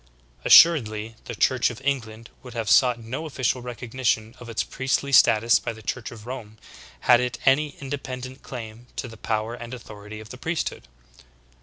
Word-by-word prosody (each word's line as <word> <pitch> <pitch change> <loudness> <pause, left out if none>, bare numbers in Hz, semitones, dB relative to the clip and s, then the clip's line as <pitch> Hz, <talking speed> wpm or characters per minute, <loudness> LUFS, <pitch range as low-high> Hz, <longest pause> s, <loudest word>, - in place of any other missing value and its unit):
Assur 165 -3 +8
edly 110 0 -6
the 120 - -6
Church 130 +4 +2
of 120 -1 -8
England 115 -5 -3
would 125 -2 -11
have 115 -3 -1
sought 125 -2 +5
no 130 +8 -5
official 130 -3 -1
recognition 120 -2 -2
of 120 - -10
its 115 - -1
priestly 135 +1 -1
status 115 -2 +6
by 115 - -4
the 110 0 -13
Church 120 +2 -4
of 110 -2 -12
Rome 120 -4 -7 0.4
had 120 -1 +6
it 125 -1 -2
any 140 +2 +3
independent 130 -2 -6
claim 115 -1 -9
to 130 - -4
the 115 - -11
power 110 +1 -2
and 120 +1 -7
authority 105 -2 -10
of 110 0 -11
the 125 - -10
priesthood. 165 - -3
120 Hz, 175 wpm, -24 LUFS, 110-130 Hz, 0.4 s, Assur